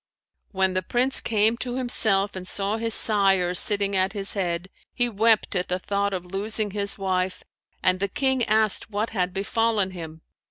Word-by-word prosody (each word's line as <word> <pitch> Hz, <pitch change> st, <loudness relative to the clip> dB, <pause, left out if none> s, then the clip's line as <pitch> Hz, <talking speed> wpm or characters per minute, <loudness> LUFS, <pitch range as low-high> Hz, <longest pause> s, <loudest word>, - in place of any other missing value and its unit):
[FN#552] -, -, -40 dB
When 190 Hz, -1 st, 0 dB
the 185 Hz, -, -1 dB
Prince 250 Hz, +8 st, +3 dB
came 220 Hz, +1 st, +1 dB
to 245 Hz, 0 st, -4 dB
himself 220 Hz, -6 st, +1 dB
and 185 Hz, -1 st, -8 dB
saw 200 Hz, +3 st, -3 dB
his 225 Hz, 0 st, 0 dB
sire 195 Hz, -4 st, +3 dB
sitting 200 Hz, +1 st, +3 dB
at 190 Hz, +1 st, 0 dB
his 200 Hz, -2 st, +1 dB
head, 175 Hz, -2 st, -3 dB, 0.2 s
he 245 Hz, -, -1 dB
wept 225 Hz, 0 st, +1 dB
at 180 Hz, -, -1 dB
the 180 Hz, -, -1 dB
thought 200 Hz, +2 st, -2 dB
of 185 Hz, -2 st, -5 dB
losing 205 Hz, +3 st, -2 dB
his 200 Hz, 0 st, -2 dB
wife 185 Hz, -1 st, -2 dB, 0.4 s
and 185 Hz, 0 st, +2 dB
the 200 Hz, -, 0 dB
King 265 Hz, +3 st, 0 dB
asked 215 Hz, -1 st, 0 dB
what 210 Hz, +2 st, -3 dB
had 185 Hz, -4 st, -1 dB
befallen 205 Hz, 0 st, -1 dB
him. 160 Hz, -3 st, -9 dB
200 Hz, 185 wpm, -24 LUFS, 185-220 Hz, 0.4 s, Prince